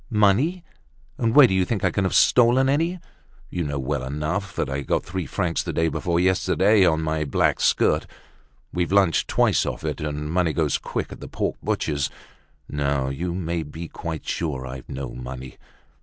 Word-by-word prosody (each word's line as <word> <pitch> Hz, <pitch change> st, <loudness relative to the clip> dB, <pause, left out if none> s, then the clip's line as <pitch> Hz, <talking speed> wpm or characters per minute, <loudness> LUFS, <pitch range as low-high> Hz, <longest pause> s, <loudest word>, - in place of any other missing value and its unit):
"Money! 120 Hz, -, +2 dB, 0.6 s
And 115 Hz, -2 st, +1 dB
where 145 Hz, -2 st, +10 dB
do 110 Hz, -, +1 dB
you 95 Hz, 0 st, +3 dB
think 100 Hz, +1 st, -2 dB
I 95 Hz, -, +3 dB
can 100 Hz, +1 st, 0 dB
have 95 Hz, -, 0 dB
stolen 125 Hz, +2 st, +5 dB
any? 165 Hz, +6 st, +1 dB, 0.5 s
You 90 Hz, -, -2 dB
know 70 Hz, -2 st, -3 dB
well 70 Hz, 0 st, -2 dB
enough 75 Hz, +9 st, -3 dB
that -, -, -1 dB
I 70 Hz, +1 st, -3 dB
got -, -, 0 dB
three 90 Hz, -1 st, -4 dB
francs 90 Hz, -4 st, -1 dB
the -, -, -4 dB
day 80 Hz, 0 st, +1 dB
before 85 Hz, +3 st, -1 dB
yesterday 95 Hz, +3 st, +3 dB
on 80 Hz, -1 st, +1 dB
my 80 Hz, 0 st, -1 dB
black 70 Hz, -, +1 dB
skirt. -, -, +2 dB, 0.7 s
We've 90 Hz, 0 st, -1 dB
lunched 95 Hz, -5 st, +3 dB
twice -, -, +3 dB
off -, -, -4 dB
it, -, -, -3 dB
and 75 Hz, 0 st, -3 dB
money 85 Hz, -2 st, +1 dB
goes 75 Hz, -4 st, +1 dB
quick -, -, -4 dB
at -, -, -9 dB
the -, -, -8 dB
pork -, -, -2 dB
butcher's. 70 Hz, -2 st, -1 dB, 0.6 s
No, 70 Hz, -2 st, -1 dB
you 85 Hz, +6 st, -3 dB
may 85 Hz, -2 st, -2 dB
be 80 Hz, +2 st, -7 dB
quite 80 Hz, -3 st, -6 dB
sure 70 Hz, -6 st, -2 dB
I've 65 Hz, 0 st, -8 dB
no 65 Hz, -1 st, -5 dB
money. 65 Hz, +1 st, -8 dB
85 Hz, 185 wpm, -24 LUFS, 75-95 Hz, 0.7 s, where